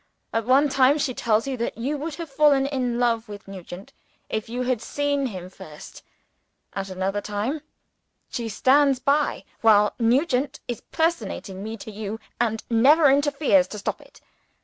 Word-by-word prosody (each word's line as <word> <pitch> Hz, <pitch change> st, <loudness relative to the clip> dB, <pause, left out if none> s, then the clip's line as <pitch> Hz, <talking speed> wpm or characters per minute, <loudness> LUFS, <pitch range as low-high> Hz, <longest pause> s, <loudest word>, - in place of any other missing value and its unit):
At 225 Hz, -1 st, 0 dB
one 275 Hz, +3 st, +5 dB
time, 270 Hz, +1 st, +4 dB
she 275 Hz, -3 st, -1 dB
tells 225 Hz, -2 st, +1 dB
you 270 Hz, -1 st, -2 dB
that 235 Hz, -1 st, -3 dB
you 265 Hz, +6 st, -2 dB
would 300 Hz, +2 st, -5 dB
have 335 Hz, -1 st, -6 dB
fallen 280 Hz, -1 st, +3 dB
in 255 Hz, -4 st, -1 dB
love 235 Hz, -2 st, 0 dB
with 205 Hz, -1 st, -10 dB
Nugent, 190 Hz, 0 st, -10 dB, 0.4 s
if 220 Hz, 0 st, -3 dB
you 250 Hz, +2 st, -2 dB
had 250 Hz, -3 st, 0 dB
seen 285 Hz, 0 st, -1 dB
him 185 Hz, -6 st, -7 dB
first. 185 Hz, -5 st, -12 dB, 0.7 s
At 195 Hz, -1 st, -4 dB
another 190 Hz, +2 st, -2 dB
time, 215 Hz, +10 st, -3 dB, 0.7 s
she 235 Hz, -2 st, -4 dB
stands 275 Hz, +5 st, +4 dB
by 285 Hz, +3 st, +1 dB, 0.2 s
while 210 Hz, -2 st, +5 dB
Nugent 260 Hz, +4 st, +1 dB
is 240 Hz, -3 st, -4 dB
personating 230 Hz, -, -2 dB
me 220 Hz, +1 st, -5 dB
to 220 Hz, -, -9 dB
you, 215 Hz, +1 st, -5 dB, 0.2 s
and 225 Hz, -2 st, 0 dB
never 275 Hz, +6 st, +5 dB
interferes 285 Hz, 0 st, +3 dB
to 210 Hz, -, -8 dB
stop 200 Hz, -, -4 dB
it. -, -, -19 dB
245 Hz, 165 wpm, -24 LUFS, 215-280 Hz, 0.7 s, one